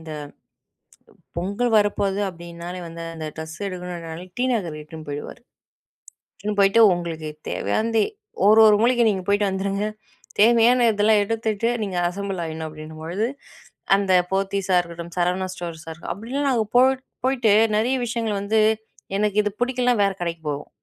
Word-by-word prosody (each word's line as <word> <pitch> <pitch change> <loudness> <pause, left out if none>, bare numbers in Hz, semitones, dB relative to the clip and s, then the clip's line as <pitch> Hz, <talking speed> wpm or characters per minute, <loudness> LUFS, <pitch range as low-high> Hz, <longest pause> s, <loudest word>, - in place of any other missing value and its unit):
இந்த 160 -1 -8 1.3
பொங்கல் 200 +7 -1
வரப்போகுது. 205 -1 +1
அப்படின்னாலே 170 +1 -8
வந்து 165 0 -8
அந்த 160 -1 -5
டிரஸ் 160 +1 -7
எடுக்கணும்னாலே 175 -2 -6
டிநகர் 225 -11 0
இட்டுன்னு 155 0 -11
போயிடுவாரு. 145 +9 -6 1.0
இட்டுன்னு 210 +1 +5
"உங்களுக்கு 165 -3 -4 0.2
தேவையானது 225 0 0 0.5
ஒரு 215 +1 +7
ஒரு 210 -1 +7
மூலைக்கி 240 0 +4
நீங்க 190 -3 -1
போய்ட்டு 205 0 +2
வந்துருங்க. 195 +2 -1 0.5
தேவையான 235 +2 +5
இதெல்லா 210 +1 +3
எடுத்துட்டு 225 0 -1 0.2
நீங்க 190 -3 -3
அசெம்பிள் 195 -1 -4
ஆயிடணும்." 160 0 -5
அப்படின்னும்பொழுது 160 +6 -4 0.7
அந்த 195 -1 0 0.2
போத்தீஸா 195 -1 0
இருக்கட்டும், 170 0 -6
சரவணா 180 +2 +1
ஸ்டோர்ஸா 165 -3 -7 0.2
அப்படிலாம் 265 +8 -2
நாங்க 230 -4 +1
போய் 260 +1 +4 0.2
போய்ட்டு 250 -5 +2 0.3
நிறைய 240 +5 +1
விஷயங்கள 230 -2 -2
வந்து 220 +2 +1 0.6
எனக்கு 210 -1 0
இது 210 - 0
பிடிக்கலனா 250 0 +2
வேற 195 - +2
கடைக்கு 170 -1 -3
போவோம். 145 0 -4
195 Hz, 130 wpm, -23 LUFS, 170-220 Hz, 1.3 s, ஒரு